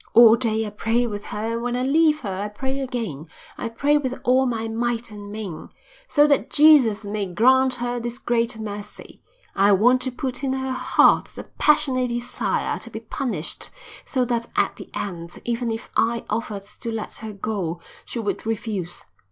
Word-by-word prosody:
"All 230 -1 +9
day 225 -2 +1
I 210 - -5
pray 225 +3 +1
with 205 -3 -5
her 220 +2 -3
and 230 - -2
when 245 0 -1
I 250 - 0
leave 305 +3 +3
her 200 -6 -3
I 200 +2 -3
pray 265 +6 -4
again, 230 - -4 0.3
I 235 - -4
pray 290 +6 +2
with 260 -3 -3
all 260 +1 +4
my 225 -2 -2
might 230 0 -2
and 205 -1 -9
main, 205 -7 -6 0.4
so 295 -8 +5
that 290 -2 +2
Jesus 265 -9 +6
may 205 -1 -2
grant 260 +8 +4
her 245 0 -2
this 240 +1 -4
great 235 -3 0
mercy. 210 -1 -7 0.3
I 200 +1 +5
want 245 +6 +4
to 260 - -1
put 260 +1 -4
in 265 -1 0
her 265 0 -2
heart 255 - +4
the - - -9
passionate 275 -4 +2
desire 240 0 -2
to - - -9
be - - -7
punished 225 - -3 0.3
so 255 -3 0
that 235 -1 -1
at - - +2
the - - -10
end, 170 -3 -5
even 235 0 -1
if 225 0 -5
I 230 +1 +1
offered 210 -2 -3
to 230 +3 -7
let 225 -1 -5
her 220 -1 -7
go, 195 -5 -3 0.2
she - - -7
would 220 -3 -2
refuse. 210 -5 -4
230 Hz, 185 wpm, -23 LUFS, 210-255 Hz, 0.4 s, All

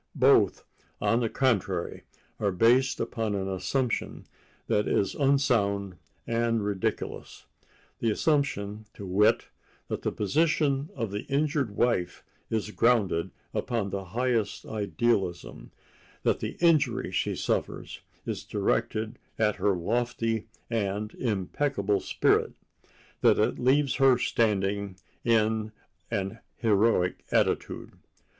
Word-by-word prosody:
Both, - - +4 0.3
on 105 +3 +2
the 115 -2 0
contrary, 100 -10 0 0.3
are 100 - +1
based 120 +8 +3
upon 110 -3 -2
an 95 -1 -2
assumption 95 +7 -2 0.4
that 105 - +1
is 100 - +1
unsound 115 - +1 0.3
and 115 -2 0
ridiculous—the 105 +3 -5
assumption, 110 -6 0
to 100 - -8
wit, 100 +3 +3 0.4
that - - -3
the - - -1
position 145 +3 +1
of 115 -3 -3
the 105 +1 -4
injured 140 -5 0
wife 115 -7 0 0.3
is 110 -1 -2
grounded 105 -8 +2 0.2
upon 115 -6 -1
the 100 0 -4
highest 115 +1 -1
idealism—that 105 -3 -2
the - - -5
injury 165 -4 +3
she - - 0
suffers - - -2 0.3
is - - -4
directed 110 +2 -1 0.2
at 105 -2 +1
her 100 -2 +2
lofty 115 +3 -1 0.2
and 105 -2 -2
impeccable 105 -1 0
spirit—that - - 0
it - - +1
leaves 135 +2 +3
her 135 -2 +5
standing 100 -4 0 0.3
in 110 -1 +2 0.4
an 105 0 -3 0.2
heroic 105 -4 +2
attitude. - - 0
110 Hz, 105 wpm, -28 LUFS, 100-125 Hz, 0.4 s, her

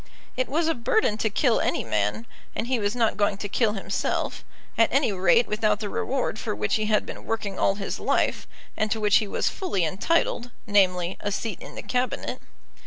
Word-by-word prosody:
It 255 - -1
was 320 +4 +1
a 325 - +3
burden 235 - +1
to 220 - +1
kill 235 +2 +2
any - - 0
man, 105 +1 -1 0.3
and - - -1
he 250 0 0
was 205 +2 -1
not 230 -4 +1
going 205 -1 +1
to 205 - -4
kill 210 +1 +1
himself, 195 - -2 0.3
at 230 - +3
any 270 -3 +3
rate 190 +5 +4
without 210 -1 +1
the 210 -2 -3
reward 255 -2 -1
for - - -3
which 105 0 -1
he 215 -1 -1
had 215 -1 +2
been - - -8
working 205 -4 -3
all 195 - +3
his 195 -1 -4
life, - - 0 0.3
and 215 - 0
to 220 - -1
which 210 -1 +5
he 215 - 0
was - - -1
fully 200 - -1
entitled, 245 - 0 0.2
namely, 185 -4 +2
a 205 - -2
seat 210 -1 -3
in - - -10
the - - -6
Cabinet. 250 0 -2
215 Hz, 205 wpm, -25 LUFS, 195-235 Hz, 0.3 s, which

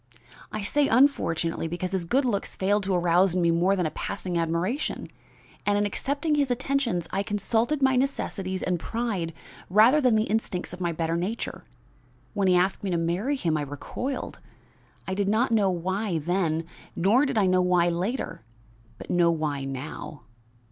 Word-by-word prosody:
I 215 - -4
say 285 +7 +2
unfortunately, 175 - +2
because 175 +2 -4
his 190 -3 -1
good 265 +10 +2
looks 205 -5 -2
failed 205 +2 +1
to 190 -1 +1
arouse 175 +1 +3
in 180 - +2
me 170 - +4
more 175 +4 +3
than 180 -3 0
a 155 - -1
passing 180 -2 -4
admiration; 170 - -1 0.5
and 205 0 +2
in 205 - +2
accepting 285 +9 -1
his 285 -3 +2
attentions, 245 -8 0
I 195 - 0
consulted 225 +8 0
my 265 -1 +4
necessities 195 -8 -2
and 180 -2 0
pride 205 -4 -2 0.4
rather 225 +10 +6
than 250 -4 +4
the 215 - +3
instincts 210 -5 -2
of 180 - -8
my 175 -1 0
better 165 0 -1
nature. 200 +7 -4 0.7
When 200 -3 +1
he 180 - +5
asked 185 +3 +1
me 195 - -1
to 175 - +1
marry 175 +12 0
him 170 - 0
I - - -1
recoiled. 145 - -5 0.7
I 190 - -2
did 200 +1 0
not 230 +4 +2
know 210 -4 +3
why 185 +2 -1
then, 165 0 0 0.3
nor 225 +11 +3
did 270 -4 -2
I 205 - +4
know 185 0 +3
why 180 -1 +3
later; 185 - -3 0.6
but - - -7
know 175 -1 +4
why 150 -4 -1
now. 135 +2 -6
190 Hz, 175 wpm, -26 LUFS, 170-230 Hz, 0.7 s, rather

